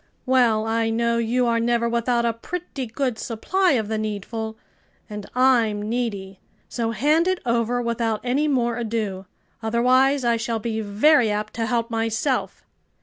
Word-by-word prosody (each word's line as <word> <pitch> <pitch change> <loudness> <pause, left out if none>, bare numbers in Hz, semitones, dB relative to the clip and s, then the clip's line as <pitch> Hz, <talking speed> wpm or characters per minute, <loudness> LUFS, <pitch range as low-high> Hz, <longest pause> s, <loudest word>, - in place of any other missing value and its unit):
"Well, 240 -4 +3
I 225 0 0
know 235 +1 +1
you 240 +2 +1
are 230 -1 +2
never 235 0 +1
without 235 0 0
a 230 - +1
pretty 275 +1 -6
good 235 0 -2
supply 360 - 0
of 220 -5 0
the 220 0 -2
needful, 220 +1 -4 0.5
and 210 -1 -8
I'm 240 -5 +3
needy. 210 -4 -3 0.3
So 230 -2 -2
hand 300 +9 +2
it 370 -1 +1
over 235 +1 0
without 230 -2 -1
any 265 +5 +1
more 240 -4 +1
ado; 215 -5 -3 0.3
otherwise 255 +4 +2
I 235 -1 +3
shall 230 0 -2
be 220 0 -3
very 220 +5 +3
apt 210 +1 -3
to 225 -1 -2
help 235 -1 -1
myself." 225 +4 -1
235 Hz, 155 wpm, -23 LUFS, 220-250 Hz, 0.5 s, Well